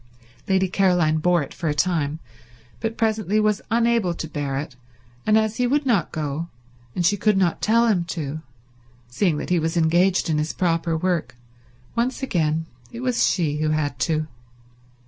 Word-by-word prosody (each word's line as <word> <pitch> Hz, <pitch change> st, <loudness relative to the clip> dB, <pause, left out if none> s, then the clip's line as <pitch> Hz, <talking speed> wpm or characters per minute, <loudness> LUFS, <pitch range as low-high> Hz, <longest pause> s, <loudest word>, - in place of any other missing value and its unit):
Lady 190 Hz, -1 st, +2 dB
Caroline 180 Hz, -4 st, +2 dB
bore 175 Hz, 0 st, +2 dB
it 135 Hz, -, -9 dB
for 165 Hz, -, -3 dB
a 150 Hz, -, -1 dB
time 155 Hz, -3 st, 0 dB, 0.6 s
but 225 Hz, 0 st, -3 dB
presently 215 Hz, -2 st, +1 dB
was 215 Hz, -1 st, +1 dB
unable 230 Hz, -5 st, +2 dB
to 160 Hz, -, -5 dB
bear 145 Hz, -3 st, -3 dB
it, 145 Hz, -1 st, -5 dB, 0.5 s
and 215 Hz, 0 st, +5 dB
as 220 Hz, 0 st, 0 dB
he 250 Hz, -1 st, +2 dB
would 285 Hz, +3 st, +1 dB
not 225 Hz, -11 st, +1 dB
go, 155 Hz, +1 st, -3 dB, 0.5 s
and 175 Hz, -, 0 dB
she 205 Hz, -, +4 dB
could 210 Hz, 0 st, +2 dB
not 180 Hz, -3 st, +1 dB
tell 230 Hz, +2 st, +3 dB
him 200 Hz, -7 st, +2 dB
to, 155 Hz, -3 st, -5 dB, 0.7 s
seeing 160 Hz, +4 st, +1 dB
that -, -, -5 dB
he 175 Hz, -, +3 dB
was 160 Hz, +2 st, -1 dB
engaged 175 Hz, +4 st, +3 dB
in 155 Hz, -2 st, +1 dB
his 155 Hz, +1 st, -2 dB
proper 165 Hz, -2 st, 0 dB
work, 175 Hz, -5 st, -1 dB, 0.6 s
once 245 Hz, +3 st, -1 dB
again 160 Hz, -8 st, 0 dB, 0.3 s
it 235 Hz, 0 st, -7 dB
was 250 Hz, -2 st, +2 dB
she 155 Hz, -5 st, 0 dB
who 155 Hz, 0 st, 0 dB
had 145 Hz, -4 st, -1 dB
to. 155 Hz, +3 st, 0 dB
175 Hz, 175 wpm, -23 LUFS, 155-215 Hz, 0.7 s, and